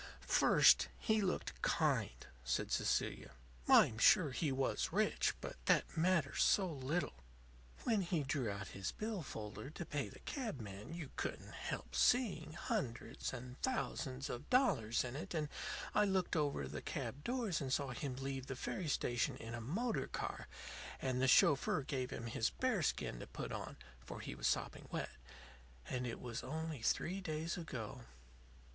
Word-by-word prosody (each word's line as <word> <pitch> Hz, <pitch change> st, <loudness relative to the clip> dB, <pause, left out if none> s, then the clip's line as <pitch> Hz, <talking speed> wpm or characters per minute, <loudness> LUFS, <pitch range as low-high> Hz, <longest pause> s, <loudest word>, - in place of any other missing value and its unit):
"First, -, -, +6 dB
he 220 Hz, -1 st, +2 dB
looked 185 Hz, -2 st, -2 dB
kind," -, -, +1 dB, 0.2 s
said -, -, 0 dB
Cecilia. -, -, 0 dB, 0.3 s
"I'm 110 Hz, -, +6 dB
sure 150 Hz, +3 st, +6 dB
he 145 Hz, +2 st, 0 dB
was 130 Hz, 0 st, 0 dB
rich; -, -, +2 dB
but -, -, -6 dB
that -, -, +3 dB
matters 165 Hz, -4 st, +2 dB
so 195 Hz, -, +5 dB
little. 150 Hz, +2 st, -1 dB, 0.7 s
When 225 Hz, -4 st, +2 dB
he 170 Hz, -4 st, 0 dB
drew 135 Hz, -4 st, 0 dB
out 100 Hz, -1 st, -4 dB
his 95 Hz, -2 st, -3 dB
bill 215 Hz, -3 st, -3 dB
folder 110 Hz, -1 st, -6 dB
to 165 Hz, +2 st, -6 dB
pay 145 Hz, -2 st, -2 dB
the -, -, -12 dB
cab 235 Hz, -, -3 dB
man 105 Hz, +8 st, -7 dB
you 160 Hz, -6 st, -6 dB
couldn't -, -, -3 dB
help -, -, -5 dB
seeing 160 Hz, -, +3 dB
hundreds 125 Hz, -7 st, -2 dB
and 125 Hz, 0 st, -8 dB
thousands 140 Hz, -, -1 dB
of 120 Hz, -, -6 dB
dollars 180 Hz, -, +3 dB
in 125 Hz, 0 st, -5 dB
it. 155 Hz, +3 st, -5 dB
And 150 Hz, -2 st, 0 dB, 0.4 s
I 210 Hz, -, +5 dB
looked 190 Hz, -2 st, +1 dB
over 145 Hz, -, 0 dB
the 70 Hz, +1 st, -5 dB
cab 145 Hz, +2 st, -4 dB
doors 235 Hz, -10 st, 0 dB
and 135 Hz, -2 st, -2 dB
saw 140 Hz, 0 st, +1 dB
him 130 Hz, +1 st, -3 dB
leave 135 Hz, 0 st, -4 dB
the 135 Hz, -, -3 dB
ferry 170 Hz, +6 st, -3 dB
station 120 Hz, -5 st, +1 dB
in 115 Hz, +1 st, -7 dB
a 120 Hz, -, -4 dB
motor 215 Hz, -, -1 dB
car; -, -, -4 dB, 0.5 s
and 130 Hz, -1 st, 0 dB
the 130 Hz, -, +4 dB
chauffeur 140 Hz, +2 st, +5 dB
gave 130 Hz, -3 st, -2 dB
him 115 Hz, -, -5 dB
his 115 Hz, 0 st, +1 dB
bearskin 200 Hz, -, 0 dB
to -, -, -7 dB
put -, -, -5 dB
on, -, -, -5 dB, 0.3 s
for -, -, -7 dB
he -, -, -5 dB
was -, -, -1 dB
sopping 60 Hz, -, -1 dB
wet. -, -, -3 dB, 0.8 s
And 125 Hz, 0 st, -2 dB
it 115 Hz, -, -4 dB
was 120 Hz, -1 st, -4 dB
only 155 Hz, 0 st, -4 dB
three 185 Hz, +11 st, +1 dB
days 160 Hz, -1 st, -2 dB
ago." 125 Hz, -7 st, -6 dB
140 Hz, 165 wpm, -38 LUFS, 120-175 Hz, 0.8 s, First